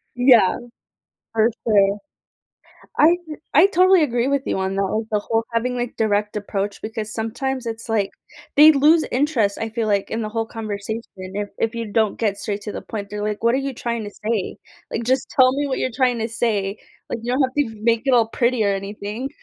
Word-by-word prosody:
Yeah. 245 -6 +5 0.8
For 225 +1 +3 0.2
sure. 200 -2 +4 1.0
I 330 +3 +6 0.4
I 320 +6 +8
totally 370 -2 +5
agree 245 -1 0
with 280 -1 +1
you - - -1
on 190 +1 -2
that, 195 - +1
like 215 +3 -2
the 210 - +2
whole, 225 +2 -1
having, 245 +2 0
like, 240 -1 -3
direct 210 -1 0
approach, 200 0 -3
because 215 -1 -5
sometimes 250 +3 -3
it's 225 0 -5
like 210 -3 0 0.5
they 305 +2 +9
lose 310 +3 +4
interest, 250 -7 +1
I 225 0 -3
feel 225 -1 -2
like, 200 -2 0
in 225 +1 -2
the 215 - -3
whole 225 0 -2
conversation 220 0 -5
if 195 +2 -5
if 225 +1 0
you 230 -3 -5
don't 220 -2 +1
get 205 -3 0
straight 205 -1 -3
to 210 - -5
the - - -5
point, 205 -2 -6
they're 210 0 -4
like, 210 0 -3
"What 235 +2 +3
are - - +2
you 270 - -5
trying 235 -2 -3
to 205 - -6
say?" 215 -3 -1 0.3
Like, 225 - -2
"Just 260 +2 +1
tell 255 -1 +5
me 285 +2 -1
what 270 - -2
you're 255 - -1
trying 250 -3 +2
to 225 - -1
say. 210 -3 -1 0.3
Like, 235 - -2
you 240 +1 -2
don't 265 +3 +2
have 260 0 -1
to 225 -7 -1
make 230 0 +2
it 265 - +4
all 230 -2 +4
pretty 235 -1 +1
or 200 - +2
anything." 205 +5 -5
225 Hz, 215 wpm, -21 LUFS, 210-250 Hz, 1.0 s, they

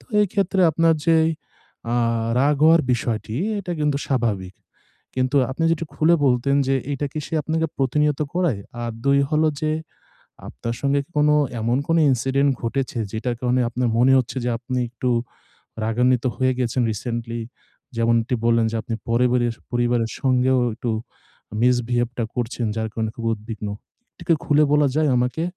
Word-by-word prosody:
তো - - -21 0.2
এই 210 - +4
ক্ষেত্রে 195 -2 +1
আপনার 165 +1 +3
যে 165 -1 +5 0.8
আ - - +1 0.4
রাগ 145 +2 +3
হওয়ার 165 +1 +6
বিষয়টি 115 -1 -2 0.2
এটা 180 -3 -4
কিন্তু 150 -1 +1
স্বাভাবিক। 105 -8 -1 0.6
কিন্তু 130 +2 +1
আপনি 165 +5 -2
যদি 165 0 -2
খুলে 165 +2 +4
বলতেন 135 +2 +2
যে 135 - +3 0.2
এটা 145 +1 -2
কি 155 - -4
সে - - -6
আপনাকে 160 +2 0
প্রতিনিয়ত 150 +2 +1
করায় 165 - 0 0.2
আর 120 - -2
২ 140 0 +4
হল 155 0 +2 0.2
যে 155 - 0 0.8
আপনার 115 0 -5
সঙ্গে 140 0 +2
কি - - -42
কোনো 150 0 +4 0.3
এমন 120 +3 +1
কোনো 165 0 +3
incident 135 +3 +1
ঘটেছে 125 0 -2
যেটার 120 +2 -2
কারণে 125 0 +1
আপনার 125 +1 -1
মনে 130 +2 +5
হচ্ছে 130 +1 -4
যে 125 - +1
আপনি 125 +1 -3
একটু 125 +1 -3 0.8
রাগান্বিত 125 +2 +2
হয়ে 130 0 +2
গেছেন 125 0 0
রিসেন্টলি 115 +1 -4 0.6
যেমনটি 115 +1 +1
বললেন 115 -1 +3
যে - - -1
আপনি 115 - -4
পরিবারে 120 +1 +2 0.3
পরিবারের 120 -2 +1
সঙ্গেও 130 -1 +2 0.2
একটু 120 0 -3 0.7
misbehave 120 -1 +2
টা 115 - +1
করছেন 120 -1 -2
যার 110 0 -1
কারণে 110 -1 -2
খুব 115 - -6
উদ্বিগ্ন। 110 -1 -7 0.4
একটু - - -15
কি 165 - +6
খুলে 150 +1 +4
বলা 150 -1 +4
যায় 155 -1 +3
আমাকে? 125 +6 0
125 Hz, 160 wpm, -22 LUFS, 115-145 Hz, 0.8 s, হওয়ার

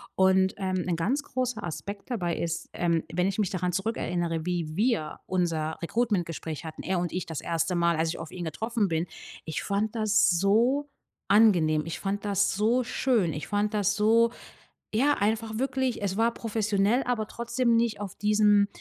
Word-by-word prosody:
Und, 190 +1 +4
ähm, 185 -2 -1
'n 175 -2 -1
ganz 250 - 0
großer 250 -6 -3
Aspekt 200 +6 -6
dabei 175 -8 -1
ist, 165 -1 -3
ähm, 170 -2 +1
wenn 180 +2 +1
ich 195 +2 -2
mich 205 -4 +1
daran 180 -1 -1
zurückerinnere, 175 -4 -2
wie 170 -3 -2
wir 210 -7 0
unser 165 -4 -1
Recruitment-Gespräch 170 -6 -2
hatten, 160 - -7
er 185 -1 0
und 175 -1 -3
ich 180 - -2
das 160 -3 -5
1. 170 +2 -1
Mal, 170 0 +2
als 160 +1 0
ich 165 - -3
auf 165 - -7
ihn 180 - -6
getroffen 210 - -1
bin, 165 +1 0 0.4
ich 160 - -4
fand 210 +3 -1
das 215 -2 +3
so 225 +11 +2 0.4
angenehm. 175 -8 +4
Ich 165 - -5
fand 205 +1 -2
das 200 -1 +2
so 225 +5 +2
schön. 230 -7 +1
Ich 150 0 -5
fand 205 +1 0
das 205 -1 +1
so 225 +2 +4 0.6
ja, 275 +7 +3
einfach 220 +1 0
wirklich, 260 -2 -1
es 195 -1 -2
war 230 +1 +2
professionell, 215 +1 +1
aber 240 -3 0
trotzdem 235 +1 0
nicht 230 -3 0
auf 200 -3 -5
diesem, 210 -1 +4
200 Hz, 180 wpm, -27 LUFS, 170-225 Hz, 0.6 s, Und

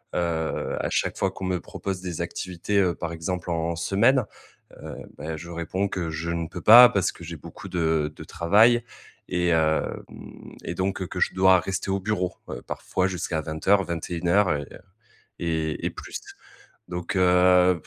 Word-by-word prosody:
Heu, 85 -2 -1
à - - -1
chaque - - 0
fois - - 0
qu'on 95 - -7
me 90 -1 0
propose 95 -2 -5
des 90 -2 -4
activités, 90 +3 -3
heu, 90 -3 +3
par 85 0 -5
exemple 90 +2 -4
en 85 0 -1
semaine, 110 +8 +3 0.6
heu, - - -7 0.2
bah, 80 +1 -4
je 85 +2 -9
réponds 85 +4 -2
que 85 -3 -3
je 80 +2 -3
ne 85 -1 -2
peux 90 - -8
pas 120 +5 +10
parce 95 -2 +1
que 85 - -14
j'ai 85 0 -7
beaucoup - - -11
de 80 -3 0
de - - -9
travail 110 +8 +4 0.5
et 90 0 0
hem 80 -1 +1 0.6
et 85 - -4
donc 95 0 -2
que 90 - -6
je - - +1
dois 95 -1 +6
rester 95 +1 -3
au 100 - 0
bureau, 95 -3 -2
heu, - - -6
parfois 95 0 -2
jusqu'à 90 -3 -2
20:00-21:00 85 +2 +1
et 70 - -3
heu - - -11 0.6
et 80 -2 -2
et - - 0
plus. - - -8 0.7
Donc 90 +2 -4
heu, 90 -1 +4
90 Hz, 170 wpm, -25 LUFS, 85-95 Hz, 0.7 s, pas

